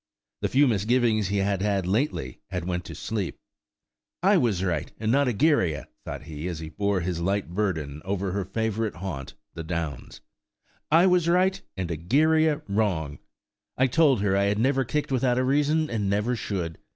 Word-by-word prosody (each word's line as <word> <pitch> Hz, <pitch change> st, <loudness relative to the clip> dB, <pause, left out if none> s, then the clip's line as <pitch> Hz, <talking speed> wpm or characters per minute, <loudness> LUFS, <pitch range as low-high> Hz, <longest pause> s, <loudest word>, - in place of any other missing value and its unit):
The -, -, +1 dB
few 140 Hz, +2 st, +4 dB
misgivings 110 Hz, -1 st, +2 dB
he 100 Hz, +1 st, -1 dB
had 100 Hz, -1 st, 0 dB
lately 95 Hz, -, -1 dB
had 90 Hz, -3 st, -3 dB
went 90 Hz, -1 st, -2 dB
to -, -, -8 dB
sleep. 105 Hz, -5 st, -3 dB, 0.9 s
"I 200 Hz, +2 st, +5 dB
was 115 Hz, -, +2 dB
right, 90 Hz, -3 st, -1 dB
and 110 Hz, 0 st, 0 dB
not 140 Hz, +2 st, +3 dB
Egeria," 115 Hz, -, +1 dB, 0.2 s
thought -, -, -6 dB
he, 80 Hz, +1 st, -6 dB
as 85 Hz, -3 st, -4 dB
he 80 Hz, 0 st, -7 dB
bore 100 Hz, +1 st, 0 dB
his 85 Hz, 0 st, -2 dB
light 95 Hz, -1 st, -1 dB
burden 80 Hz, -8 st, -2 dB
over 95 Hz, 0 st, -2 dB
her 100 Hz, +1 st, -1 dB
favourite 110 Hz, +2 st, -2 dB
haunt, 85 Hz, -7 st, -6 dB, 0.2 s
the 80 Hz, -, -6 dB
Downs. 80 Hz, -5 st, -5 dB, 0.7 s
"I 165 Hz, +4 st, +6 dB
was 180 Hz, -2 st, +3 dB
right, 185 Hz, +2 st, +2 dB, 0.2 s
and 90 Hz, -2 st, -3 dB
Egeria 150 Hz, -, +2 dB
wrong. 95 Hz, -8 st, -1 dB, 0.6 s
I 130 Hz, -, +4 dB
told 135 Hz, -3 st, +3 dB
her 100 Hz, -2 st, +2 dB
I 100 Hz, 0 st, +3 dB
had 100 Hz, +1 st, +1 dB
never 135 Hz, +4 st, +2 dB
kicked 145 Hz, +4 st, -2 dB
without 125 Hz, -1 st, +2 dB
a 130 Hz, -, +2 dB
reason, 150 Hz, +4 st, +2 dB
and 105 Hz, -6 st, -1 dB
never 105 Hz, +5 st, +1 dB
should. 90 Hz, -7 st, -4 dB
100 Hz, 175 wpm, -26 LUFS, 90-130 Hz, 0.9 s, I